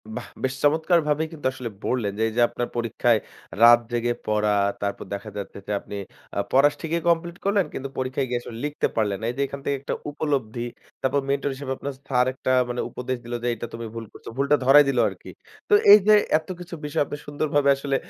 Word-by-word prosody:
বাহ! - - -6 0.2
বেশ 130 0 0
চমৎকার 160 +4 +4
ভাবেই 150 +2 +1
কিন্তু 155 - -10
আসলে 125 -3 -5 0.2
বললেন 120 -5 0
যে, - - -2
এই 110 - -4
যে, - - +4
আপনার 120 - -3
পরীক্ষায় 115 0 +2 0.4
রাত 120 0 +9
জেগে 120 0 0
পড়া, 105 -1 +2 0.3
তারপর 100 0 -3
দেখা 100 +2 -5
যাচ্ছে 100 - -6
যে, - - -3
আপনি 105 - -9 0.4
আ - - +2
পড়া 135 +2 +6
স - - -16
ঠিকই 170 +1 -1
কমপ্লিট 170 +1 0
করলেন 200 -2 +3
কিন্তু 135 +1 -5
পরীক্ষায় 130 +1 -1
গিয়ে 120 -1 0
আসলে 115 -1 -9
লিখতে 150 0 0
পারলেন 105 -3 +1
না। - - -3
এই - - -11
যে, - - 0
এখান 140 - -7
থেকে 140 - +1
একটা 140 - -3 0.2
উপলব্ধি। 130 -6 -2 0.4
তারপর 135 +2 +1
মেন্টর 140 0 0
হিসেবে 135 -1 -6
আপনার 140 - -5
স্যার 125 -2 +3
একটা 130 - -2 0.2
মানে 120 - -2
উপদেশ 130 +1 -4
দিলো 120 0 -3
যে, 120 - 0
"এইটা 120 +1 -6
তুমি 115 0 -5
ভুল 115 -1 -5
করছ।" - - -16
ভুলটা 140 +2 +3
ধরাই 145 +3 +8
দিলো 125 -3 +2
আরকি। - - -11 0.4
তো - - +3 0.2
এই 210 - +11
যে, 215 - +8 0.2
এতকিছু 175 +1 -7
বিষয় 145 - -1
আপনি 145 - -6
সুন্দরভাবে 145 -1 +1
আসলে 140 0 -2
130 Hz, 215 wpm, -24 LUFS, 120-145 Hz, 0.4 s, এই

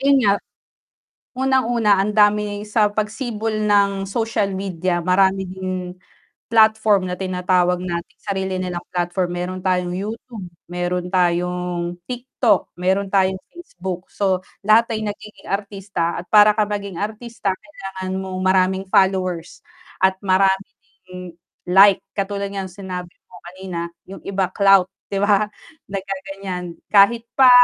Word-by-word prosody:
Yun 275 +1 +4
nga, 200 - +5 1.1
unang-una 240 -6 +3
ang 210 - -1
dami 210 0 +2
sa 210 0 +2
pagsibol 220 +1 -3
ng 200 -2 +2
social 220 -1 -1
media, 185 -2 -2
marami 190 +2 +2
din 185 0 -5 0.8
platform 220 -4 +4
na 180 - -3
tinatawag 180 -1 +1
natin 170 -2 -5
sarili 190 -2 -2
nilang 180 -1 -3
platform, 175 +1 -1
meron 180 +1 -4
tayong 180 -1 +1
YouTube, 215 +1 -6 0.2
meron 180 0 -2
tayong 180 -1 0
TikTok, 245 0 0
meron 190 +2 0
tayong 190 -1 +3
Facebook, 185 - -7
so 190 -2 0 0.3
lahat 225 +2 +4
ay 220 - -2
nagiging 210 +1 -8
artista 195 -4 -2
at - - -16
para 210 0 +7
ka 215 0 +2
maging 200 -3 -4
artista 220 0 -4
kailangan 190 -4 -6
mong 190 -1 -5
maraming 190 0 +2
followers 185 -3 +1 0.4
at 190 0 +4
maraming 190 0 +2 0.3
ding 180 -1 -9 0.3
like 195 +2 +7 0.2
katulad 200 0 -2
ng 195 -1 -4
sinabi 180 -1 -7 0.2
mo - - -17
kanina 180 -2 -6 0.2
yung 195 - -9
iba 195 -1 -1
clout 195 -2 +5 0.2
'di 200 - -2
ba, 205 0 +3 0.4
naggaganyan 195 -2 -5 0.2
kahit 225 +3 +5
pa 260 -1 +8
195 Hz, 130 wpm, -21 LUFS, 180-210 Hz, 1.1 s, pa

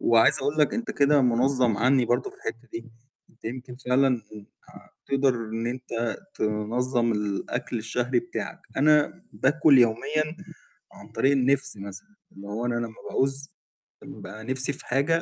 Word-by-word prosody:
وعايز 115 -1 +5
اقول 145 +3 -2
لك 150 - +3
أنت 235 -1 -3
كده 145 0 +4
مُنظّم 125 -2 +3
عني 130 +1 +3
برضه 120 +2 0
في - - -19
الحتة 115 +1 -7
دي، 115 +1 -7 0.4
أنت - - -31
يمكن 125 +2 -6
فعلًا 130 -1 +1 0.5
آآ - - -16 0.2
تقدر 135 -2 +2
إن 115 0 -4
أنت 120 -2 -3 0.2
تنظّم 115 +3 0
الأكل 105 +3 -3
الشهري 120 +3 0
بتاعك، 180 - -6 0.2
أنا 150 +5 +3
باكل 145 0 +4
يوميًا 155 +7 +1 0.6
عن - - -14
طريق 135 - +2
النِفس 135 -3 +2
مثلًا، 100 - -9 0.2
اللي 100 +1 -11
هو 110 +4 -3
أنا 120 - 0
لما 115 -1 -4
باعوز 135 +1 0 0.5
بابقي 110 +3 -10
نفسي 130 +3 +1
في - - -7
حاجة 150 +6 +1
125 Hz, 150 wpm, -26 LUFS, 115-140 Hz, 0.6 s, وعايز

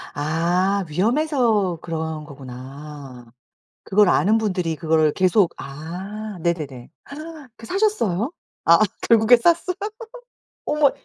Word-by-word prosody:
아 175 +6 0
위험해서 225 - +1
그런 160 -2 -4
거구나 135 -2 -10 0.5
그걸 205 0 +4
아는 210 +5 +3
분들이 180 -7 -1
그거를 155 -1 +2
계속 185 +1 +3
아 185 +8 -7
네네네. 150 -8 -3 0.7
그 230 - -12
사셨어요? 345 - 0 0.3
아 170 0 +7 0.3
결국에 230 +1 +6
샀어요? 340 +8 +2 0.9
어머 295 -2 +3
180 Hz, 215 characters per minute, -22 LUFS, 155-220 Hz, 0.9 s, 아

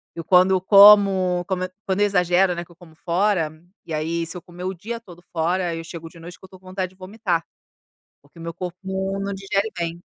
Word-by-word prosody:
Eu, 165 - -6
quando 185 +2 +5
eu 190 - +3
como, 195 -3 +6
como 185 -2 -2 0.2
quando 190 0 -1
eu - - +5
exagero, 180 -1 +2
né, 175 0 -5
que - - -22
eu - - -18
como 160 -2 -17
fora, 175 -2 0 0.3
e 160 - -6
aí, 165 +2 -2
se 165 - -6
eu 180 - -7
comer 175 +1 -11
o 185 +1 -2
dia 225 +6 -6
todo 175 -6 -15
fora, 175 +1 0
eu 165 - -6
chego 165 0 -9
de 170 - -16
noite 175 +2 -10
que - - -36
eu - - -17
tô 185 0 -15
com 185 - -25
vontade 185 0 -3
de 190 - -23
vomitar. 185 -3 -3 0.8
Porque 145 +4 -21
o 165 - -9
meu 165 - -5
corpo 180 0 -6 0.4
não 200 0 -3
digere 195 +2 -1
bem. 170 0 -3
180 Hz, 235 wpm, -22 LUFS, 170-190 Hz, 0.8 s, como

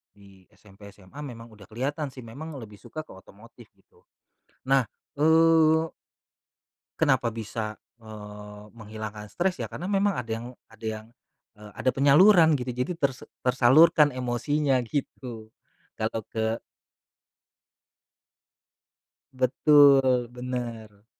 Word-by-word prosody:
di 100 -2 -19
SMP, 100 0 -16
SMA, 100 +9 -15
memang 120 -5 -9
udah 105 -2 -16
kelihatan 140 +6 -3
sih, 130 -1 -12
memang 145 +7 -9
lebih 105 -4 -11
suka 155 - -8
ke - - -16
otomotif 105 +5 -16
gitu. 95 - -29 0.7
Nah, 135 -2 +4 0.3
eee 160 +1 +4 1.1
kenapa 130 -6 +2
bisa, 110 -1 -5 0.2
eee, 105 -1 -11
menghilangkan 110 -1 -8
stres, 180 - -2
ya - - -3
karena - - -8
memang 200 -1 +1
ada 120 -2 -5
yang 115 +1 -4 0.2
ada 110 0 -12
yang 110 0 -6 0.5
eee, 105 -1 -14
ada 130 - +1
penyaluran 160 +4 +6
gitu 125 -1 -4
jadi 125 +8 -2
tersa 135 -5 -2 0.2
tersalurkan 135 +5 +5
emosinya 130 +2 0
gitu, 120 -3 -6 0.5
gak 110 - +1
tau 110 - -4
ke 110 +1 -2 2.8
Betul, 130 -1 +4
bener. 120 -4 -7
125 Hz, 115 wpm, -26 LUFS, 110-145 Hz, 2.8 s, penyaluran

